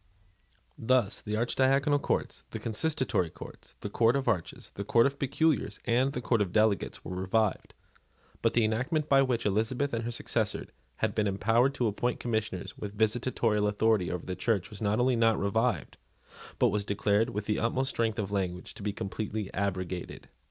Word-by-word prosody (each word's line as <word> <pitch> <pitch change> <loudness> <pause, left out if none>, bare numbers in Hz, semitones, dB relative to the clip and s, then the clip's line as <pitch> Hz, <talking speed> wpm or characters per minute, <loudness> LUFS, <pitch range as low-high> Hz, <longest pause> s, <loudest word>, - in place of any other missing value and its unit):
Thus, 120 -3 +1
the 105 0 -3
Archidiaconal 135 +5 +2
Courts, - - -2
the - - -5
Consistory 115 - 0
Courts, 85 -7 -12
the 105 - -4
Court 115 +3 +3
of 135 -1 -1
Arches, 85 -4 -2
the 100 - -5
Court 115 +3 +4
of 140 0 -1
Peculiars, 140 -6 +1
and 125 +3 +2
the 125 - -3
Court 115 -2 +1
of 95 -4 0
Delegates 110 -1 +1
were 90 - -5
revived: 95 +3 0 0.7
but - - +1
the 115 -2 +4
enactment 135 +8 0
by 135 -2 +5
which 125 -4 0
Elizabeth 115 +7 0
and 115 0 -1
her 115 - -3
successors - - -1 0.3
had - - -1
been 105 -2 +1
empowered 115 +7 +2
to 125 - 0
appoint 115 +3 -1
Commissioners 110 -6 -3
with 105 0 -7
visitatorial 110 -1 +1
authority 105 -2 +2
over 90 - -4
the 90 - -4
Church 100 +1 -1
was 105 - -9
not 105 +1 +1
only 125 +1 +3
not 115 -1 +3
revived, 100 - 0 0.6
but - - +4
was 105 0 0
declared, 100 +2 +1
with 105 +1 -4
the 105 - 0
utmost 130 +4 0
strength 115 -1 0
of 100 -3 -3
language, 90 -3 -3
to 110 - -12
be 105 +1 -1
completely 105 0 -4
abrogated. 90 -3 -3
110 Hz, 180 wpm, -29 LUFS, 100-125 Hz, 0.7 s, by